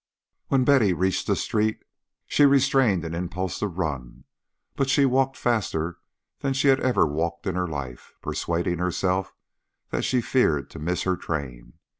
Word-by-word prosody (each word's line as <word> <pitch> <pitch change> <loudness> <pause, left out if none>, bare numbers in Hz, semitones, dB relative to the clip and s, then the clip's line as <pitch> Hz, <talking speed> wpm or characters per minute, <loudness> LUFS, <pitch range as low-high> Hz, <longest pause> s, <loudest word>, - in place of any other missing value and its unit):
When 135 -2 +3
Betty 125 -9 +4
reached 95 +2 0
the - - +2
street, 110 0 -1 0.4
she 145 - +4
restrained 135 -9 +3
an 80 - -5
impulse 90 +1 -3
to 105 - 0
run, 75 -10 -4 0.5
but 135 -1 0
she 140 0 +4
walked 135 +1 +1
faster 85 -8 -1 0.4
than 135 -1 -1
she 135 +1 +2
had 135 0 +5
ever 130 -8 +3
walked 85 +3 -2
in 95 - -1
her 90 0 -1
life, 70 -6 -7
persuading 85 0 -2
herself 90 +1 0 0.6
that - - -1
she 130 - +2
feared 80 - +1
to - - -9
miss 85 +4 -1
her 95 -1 +1
train. 70 -9 -5
90 Hz, 160 wpm, -25 LUFS, 85-130 Hz, 0.6 s, had